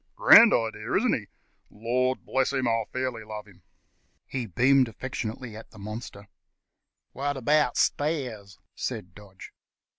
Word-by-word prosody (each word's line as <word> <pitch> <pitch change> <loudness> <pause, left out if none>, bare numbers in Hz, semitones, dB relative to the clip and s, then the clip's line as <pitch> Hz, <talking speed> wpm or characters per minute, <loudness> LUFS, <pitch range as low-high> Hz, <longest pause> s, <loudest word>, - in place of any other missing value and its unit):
Grand 370 - +8
idea, 110 -1 -1
isn't 235 +3 +2
he? 105 -3 -3 0.4
Lor' 125 +4 0
bless 135 +1 -1
you, 130 -2 0
I 115 -1 0
fairly 130 -3 -3
love 105 -1 -8
him." 95 -2 -19 0.6
He 125 -4 -4
beamed 130 +6 +3
affectionately 115 0 -6
on 110 - -10
his - - -16
monster. 105 0 -8 0.8
"What 145 +1 -3
about 145 0 +2
stairs?" 125 -10 -1 0.2
said 90 0 -5
Dodge. 100 -2 -13
120 Hz, 130 wpm, -26 LUFS, 105-135 Hz, 0.8 s, Grand